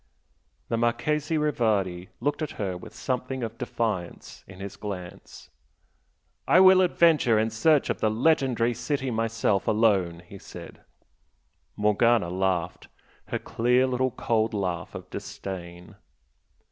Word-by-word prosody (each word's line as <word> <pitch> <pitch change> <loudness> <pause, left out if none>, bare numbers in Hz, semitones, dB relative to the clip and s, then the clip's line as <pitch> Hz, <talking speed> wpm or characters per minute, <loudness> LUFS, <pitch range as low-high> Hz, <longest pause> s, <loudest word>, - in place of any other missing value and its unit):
The 115 - 0
Marchese 145 +7 0
Rivardi 105 -11 0
looked 145 +3 -1
at 155 - -3
her 95 -3 -2
with 90 - -11
something 130 0 -3
of 115 0 -6
defiance 110 -7 -4
in 95 -1 -13
his 100 0 -7
glance. 100 -4 -8 1.0
"I 180 - +6
will 185 0 +7
adventure 165 -10 +4
in 110 +1 +1
search 145 +7 +3
of - - -4
the 110 - +2
legendary 125 -1 +2
city 130 +3 -2
myself, 115 -3 0
alone!" 95 -6 +2
he 100 +2 -12
said. - - -11 0.9
Morgana 105 -2 +2
laughed, 90 -2 -1 0.4
her - - -2
clear 125 +3 +1
little 130 0 0
cold 110 -2 -1
laugh 90 -4 -3
of - - -8
disdain. 90 -2 -8
115 Hz, 125 wpm, -26 LUFS, 95-130 Hz, 1.0 s, will